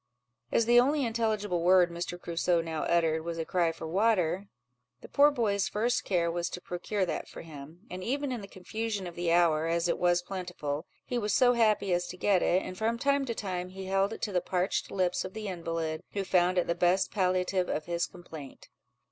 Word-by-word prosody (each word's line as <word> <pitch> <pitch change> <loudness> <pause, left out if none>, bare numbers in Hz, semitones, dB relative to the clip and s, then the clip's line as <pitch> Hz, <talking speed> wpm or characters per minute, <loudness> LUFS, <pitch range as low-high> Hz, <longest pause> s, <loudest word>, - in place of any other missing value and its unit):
As 230 - +3
the 240 +1 +6
only 280 +2 +2
intelligible 215 -6 0
word 180 0 +5
Mr. 175 +1 -5
Crusoe 170 0 0
now 165 -1 -3
uttered 160 -2 +2
was 170 0 -4
a 165 - -2
cry 170 -2 +1
for 165 - -8
water, 190 0 +1 0.5
the - - -10
poor 290 +1 +5
boy's 215 -8 0
first 235 +4 0
care 170 -3 +1
was 175 +1 -2
to - - -6
procure 185 +3 -2
that 170 - -4
for - - -10
him; 155 +1 -11
and 185 0 -7
even 275 +5 -1
in 245 -3 -3
the 200 - -9
confusion 205 +2 -4
of 175 - -6
the 175 0 -1
hour, 165 -2 +3
as 170 +1 +1
it 170 - 0
was 175 0 +3
plentiful, 175 -5 -4 0.2
he 245 - -1
was 210 -2 0
so 245 -1 +5
happy 215 -5 +2
as 175 0 0
to 180 - -8
get 195 -1 +3
it, 185 +2 +2
and 185 - -7
from 225 +1 0
time 280 +2 +1
to 235 -3 -3
time 185 -3 -3
he 190 +1 -8
held 195 +2 +1
it - - -7
to 210 - -1
the 180 -2 +1
parched 180 +1 -1
lips 180 -2 0
of 185 +2 -8
the 215 -1 -5
invalid, 165 -3 -3
who 200 - -1
found 180 -1 +2
it 180 - +3
the 170 - 0
best 180 +2 +2
palliative 185 -1 +1
of 150 - -2
his 170 0 -1
complaint. 160 -6 -11
180 Hz, 215 wpm, -29 LUFS, 170-210 Hz, 0.5 s, the